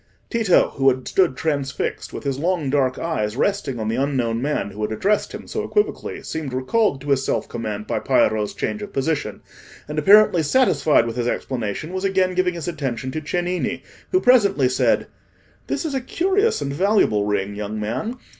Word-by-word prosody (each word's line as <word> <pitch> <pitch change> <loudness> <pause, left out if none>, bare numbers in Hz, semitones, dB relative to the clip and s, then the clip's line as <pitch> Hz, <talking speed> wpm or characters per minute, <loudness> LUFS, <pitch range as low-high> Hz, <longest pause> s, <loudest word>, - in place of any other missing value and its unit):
Tito, 225 -6 +3
who 135 0 +5
had 130 -1 -2
stood 175 -9 +2
transfixed, 140 -2 -2
with - - -7
his 135 -1 -2
long 165 -4 0
dark 135 -3 +1
eyes 115 -9 -2
resting 170 - 0
on 110 - -2
the 115 +2 -1
unknown 125 -4 0
man 140 -7 -1
who 105 +2 -8
had 105 0 -1
addressed 200 - 0
him - - -8
so - - -3
equivocally, 415 0 -1
seemed 155 -5 -5
recalled 135 - +1
to 145 0 -3
his 135 -1 +2
self - - -1
command 110 -3 -5
by - - -1
Piero's 105 -1 +1
change 215 - -3
of 205 -1 -7
position, 135 -6 -2 0.5
and 150 +1 -2
apparently 200 +1 +6
satisfied 160 - +3
with 115 0 -5
his 120 -1 -1
explanation, 120 - -3
was 185 0 -3
again 190 -1 +1
giving 180 -1 +1
his 170 -1 -5
attention 135 -6 -3
to 155 - -4
Cennini, 175 +3 -2 0.3
who 370 - +4
presently 200 - +4
said— 130 - +2 0.6
"This - - -2
is 305 - -2
a 265 - -1
curious 385 - +1
and 140 0 -3
valuable 150 - +2
ring, 100 -1 -1
young 105 +1 -5
man. 125 - -3
145 Hz, 185 wpm, -22 LUFS, 120-190 Hz, 0.6 s, apparently